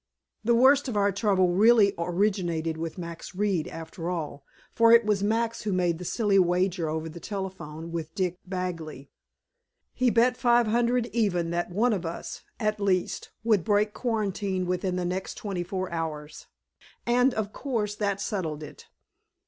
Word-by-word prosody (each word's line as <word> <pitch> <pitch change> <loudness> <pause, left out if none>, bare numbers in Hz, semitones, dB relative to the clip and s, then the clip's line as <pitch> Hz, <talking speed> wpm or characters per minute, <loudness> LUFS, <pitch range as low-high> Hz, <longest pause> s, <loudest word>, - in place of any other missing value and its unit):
The 235 +1 +3
worst 270 +4 +5
of 235 -5 -2
our 200 0 +3
trouble 195 -2 +2
really 205 +2 +5
originated 170 -2 0
with 165 +1 -5
Max 170 +1 -7
Reed, 195 -5 0
after 165 +1 -6
all. 155 -5 -4 0.3
For 230 0 +5
it 235 -1 +7
was 210 -2 +1
Max 225 +2 0
who 210 - -2
made 175 -3 +1
the 180 - -7
silly 205 0 +2
wager 180 -1 +1
over 160 +1 -3
the 160 +2 -9
telephone, 170 -5 -6
with 165 -1 -5
Dick 180 -2 -1
Bagley. 170 -7 -5 0.8
He 255 -1 +2
bet 245 +2 +3
five 240 -1 +4
hundred 240 +2 +2
even 180 -7 +1
that 175 +1 -1
one 220 +6 +2
of 190 -4 -2
us, 165 0 -6 0.2
at 215 -2 0
least, 190 -3 0
would 215 -6 +3
break 210 +1 +2
quarantine 200 -5 -1
within 180 +1 -1
the 180 -1 -1
next 185 +2 -3
twenty 195 -4 -4
four 185 +1 -4
hours, 155 -2 -5 0.6
and, 250 +2 +3
of 210 -1 -3
course, 225 -7 -2
that 200 -2 -1
settled 170 -8 -3
it. 150 - -11
190 Hz, 165 wpm, -27 LUFS, 170-215 Hz, 0.8 s, it